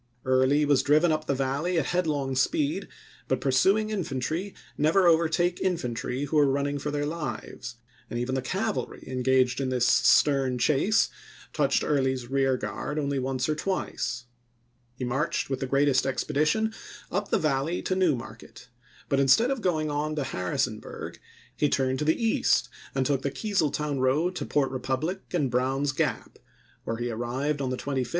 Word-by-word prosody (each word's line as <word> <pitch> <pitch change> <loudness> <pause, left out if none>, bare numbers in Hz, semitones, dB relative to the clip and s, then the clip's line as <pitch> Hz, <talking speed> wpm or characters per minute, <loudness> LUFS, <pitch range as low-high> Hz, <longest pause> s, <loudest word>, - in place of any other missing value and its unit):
Early 130 +3 +3
was 145 -2 +4
driven 155 +4 +4
up 155 0 -1
the 140 - +1
Valley 140 +7 -1
at 155 - +1
headlong 150 -7 -1
speed, 300 - 0 0.4
but - - 0
pursuing 190 +11 +2
infantry 165 0 -3 0.2
never 165 +6 +3
overtake 170 +1 +2
infantry 130 -6 -2
who 150 +2 +1
are 145 -2 +4
running 140 +1 -1
for 150 - -3
their 145 0 -1
lives, 150 -5 -5 0.3
and 120 - -4
even 125 +2 -2
the 130 - 0
cavalry 200 - -3
en 130 -1 -4
gaged 130 0 +2
in 130 - -1
this 125 -2 +1
stern 135 -2 +4
chase 155 - +2 0.4
touched 140 -3 +2
Early's 130 -3 0
rear 135 -1 +2
guard 150 +3 -4
only 140 -2 0
once 130 0 -1
or 155 - +1
twice. 150 -7 -3 0.7
He 125 - -4
marched 135 +3 -1
with 135 - -1
the 135 - -3
greatest 140 0 +2
expedition 155 - 0 0.4
up 200 +2 -2
the - - +3
Valley 155 +2 0
to 185 - 0
New 180 -6 +3
Market, 120 +1 -11 0.4
but 135 - +1
instead 140 - +4
of 270 -3 -2
going 155 -5 0
on 150 +1 -1
to 150 - -1
Harrisonburg 90 -8 -3 0.4
he 150 - +1
turned 130 -1 0
to 150 - -1
the 160 - +2
east 225 -2 +2 0.3
and 135 -1 +1
took 140 -2 +1
the 140 - -1
Keezeltown 150 -5 -1
road 150 +8 +1
to - - -4
Port 140 -3 +1
Republic 135 +8 -2
and 150 -8 0
Brown's 135 +3 +1
Gap, - - -2 0.5
where 115 - -2
he 120 +1 -2
arrived 130 +6 -2
on 135 - -1
sept., 130 - -4
1864. 130 -3 -1
140 Hz, 170 wpm, -27 LUFS, 130-160 Hz, 0.7 s, was